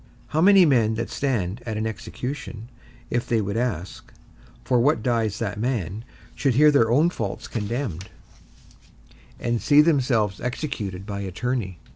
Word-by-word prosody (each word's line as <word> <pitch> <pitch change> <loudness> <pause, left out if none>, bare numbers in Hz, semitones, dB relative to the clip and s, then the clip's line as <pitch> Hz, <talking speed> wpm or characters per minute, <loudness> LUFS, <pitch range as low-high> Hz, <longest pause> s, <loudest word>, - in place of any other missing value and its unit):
How 155 - +1
many 195 0 +7
men 115 -7 +3
that 115 - -4
stand 115 -6 -1
at 110 -3 -4
an 110 - -1
execution, 115 +1 -6 0.4
if 120 0 -1
they 115 - +2
would 100 0 -2
ask, 110 -7 -3 0.5
For 125 -2 +2
what 120 -3 +2
dies 115 -4 0
that 105 -3 -3
man? 110 -4 -2 0.3
should 135 -5 0
hear 150 +3 +6
their 115 -6 +3
own 150 +9 +4
faults 110 - -4
condemned, 110 - -4 1.3
and 120 -1 -1
see 145 0 +5
themselves 125 - +1
executed 115 -8 -4
by 100 -1 -5
attorney? 100 0 -3
115 Hz, 145 wpm, -24 LUFS, 105-130 Hz, 1.3 s, many